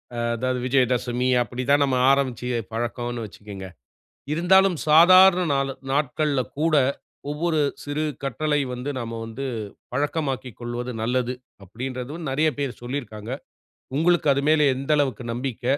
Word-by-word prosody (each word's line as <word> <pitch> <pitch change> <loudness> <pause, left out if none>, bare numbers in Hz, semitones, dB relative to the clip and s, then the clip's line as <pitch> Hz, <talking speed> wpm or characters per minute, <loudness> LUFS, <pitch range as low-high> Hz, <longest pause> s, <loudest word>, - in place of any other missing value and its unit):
ஆ - - -5 0.2
அதாவது 130 +2 -1
விஜயதசமி 125 -1 +1
அப்டி 120 +2 -3
தான் 145 0 +5
நம்ம 135 -2 +1
ஆரம்பிச்சு 130 -3 0 0.2
பழக்கம்னு 120 0 -3
வச்சுக்கங்க. 100 -2 -9 0.7
இருந்தாலும் 180 +2 +4
சாதாரண 180 +3 +7
நாளு 135 0 0 0.2
நாட்கள்ல 145 0 +1 0.2
கூட 165 0 +2 0.6
ஒவ்வொரு 160 +2 0 0.3
சிறு 145 +2 -2 0.2
கட்டளை 145 +3 0
வந்து 125 +3 -4
நாம 115 -2 -5
வந்து 115 +5 -5 0.5
பழக்கமாக்கிக் 140 -4 -2
கொள்வது 120 +1 -4
நல்லது, 125 +2 0 0.3
அப்டின்றதும் 130 - -6
நெறைய 155 +4 +2
பேரு 140 -3 -2
சொல்லியிருக்காங்க. 120 -3 -5 0.6
உங்களுக்கு 165 0 +3
அது 140 +1 0
மேல 155 -1 +4
எந்த 135 +3 -6
அளவுக்கு 130 -5 0
நம்பிக்க, 125 0 -4
135 Hz, 125 wpm, -24 LUFS, 120-150 Hz, 0.7 s, சாதாரண